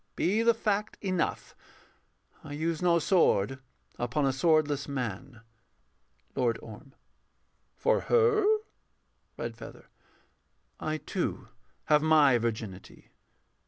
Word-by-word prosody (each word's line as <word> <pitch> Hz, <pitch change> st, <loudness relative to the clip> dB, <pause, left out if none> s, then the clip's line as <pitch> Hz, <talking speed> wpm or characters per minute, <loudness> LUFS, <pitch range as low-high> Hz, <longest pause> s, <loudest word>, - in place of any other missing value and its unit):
Be 205 Hz, +5 st, +1 dB
the 230 Hz, 0 st, +4 dB
fact 210 Hz, -2 st, -1 dB
enough, 185 Hz, -4 st, -2 dB, 0.9 s
I 145 Hz, -, -8 dB
use 160 Hz, +2 st, -2 dB
no 175 Hz, -1 st, +4 dB
sword 135 Hz, -, +2 dB, 0.4 s
upon 125 Hz, +4 st, 0 dB
a 135 Hz, -, +1 dB
swordless 150 Hz, -1 st, +2 dB
man. 125 Hz, -2 st, -5 dB, 0.9 s
LORD 120 Hz, -3 st, +1 dB
ORM. 115 Hz, +5 st, -12 dB, 0.8 s
For -, -, +2 dB
her? 455 Hz, -2 st, +3 dB, 0.9 s
REDFEATHER. -, -, -8 dB, 0.9 s
I 155 Hz, 0 st, -2 dB
too -, -, -4 dB, 0.4 s
have 150 Hz, 0 st, +4 dB
my 150 Hz, -5 st, +5 dB
virginity. 110 Hz, -5 st, -6 dB
150 Hz, 95 wpm, -29 LUFS, 125-180 Hz, 0.9 s, my